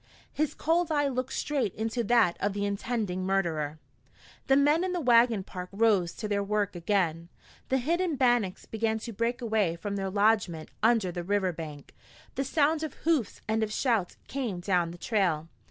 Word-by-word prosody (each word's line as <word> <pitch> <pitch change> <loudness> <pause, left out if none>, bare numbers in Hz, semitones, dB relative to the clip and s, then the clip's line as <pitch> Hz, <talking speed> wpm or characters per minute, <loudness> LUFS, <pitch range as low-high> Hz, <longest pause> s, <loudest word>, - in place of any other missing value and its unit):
His 305 -1 -1
cold 330 +1 +1
eye 290 -2 +2
looked 255 -1 -2
straight 275 -10 -1
into 225 +2 -2
that 225 -6 +4
of 200 0 0
the 205 0 -2
intending 200 -2 -2
murderer. 165 -6 -1 0.7
The 270 - +5
men 295 +5 +4
in 370 -1 -1
the 355 - -1
wagon 235 - +4
park 180 -1 -7
rose 200 -5 +2
to 215 - -5
their 205 -1 0
work 205 -1 -1
again. 170 -2 0 0.4
The 265 - +3
hidden 335 +5 0
Bannacks 240 -7 +1
began 220 0 -1
to 230 +1 -7
break 235 +4 -1
away 215 -7 +1
from 200 +4 -4
their 195 -1 -2
lodgment 200 -5 +1
under 220 -4 +3
the 175 0 -5
river 190 -1 0
bank. 155 -3 -8 0.4
The 270 - -1
sound 305 +2 +2
of 315 - -4
hoofs 305 - +1
and 220 +1 +1
of 215 -1 -1
shouts 220 -6 0
came 245 -9 -3
down 175 -2 +1
the 175 - -9
trail. 175 -6 0
215 Hz, 180 wpm, -28 LUFS, 185-250 Hz, 0.7 s, The